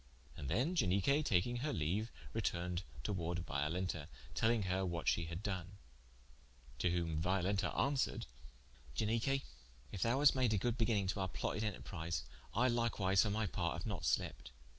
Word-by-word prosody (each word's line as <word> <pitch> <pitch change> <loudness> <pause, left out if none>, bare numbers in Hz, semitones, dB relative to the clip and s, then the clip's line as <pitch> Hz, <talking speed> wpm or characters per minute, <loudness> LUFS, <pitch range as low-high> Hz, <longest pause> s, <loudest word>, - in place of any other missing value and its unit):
And 70 -3 -5
then 125 - +2
Ianique 120 - +3
taking 115 +4 +2
her 150 +5 -1
leaue, 90 +8 0 0.3
retourned 90 -5 -1 0.2
towarde 85 0 -2
Violenta, 75 +2 -1 0.3
telling 115 -1 +2
her 95 +1 0
what 85 -2 -2
shee 85 - +3
had 85 +4 -5
doen. 95 -2 -3 1.1
To 90 - +2
whom 85 -3 0
Violenta 95 +3 +1
answeared: 140 -1 +1 0.7
"Ianique, 115 - +1 0.5
if 95 - -5
thou 115 +5 +3
hast 145 +1 +6
made 125 -5 +2
a - - +2
good 115 +4 +1
beginninge 110 -5 +2
to 100 - -5
our 95 - +1
plotted 105 - -2
enterprise, 85 -7 -3 0.3
I 125 +4 +4
likewise 115 -6 +3
for 110 - +2
my 110 +2 +1
part 95 - -1
haue - - -3
not - - -3
slept. - - 0
95 Hz, 160 wpm, -37 LUFS, 85-115 Hz, 1.1 s, hast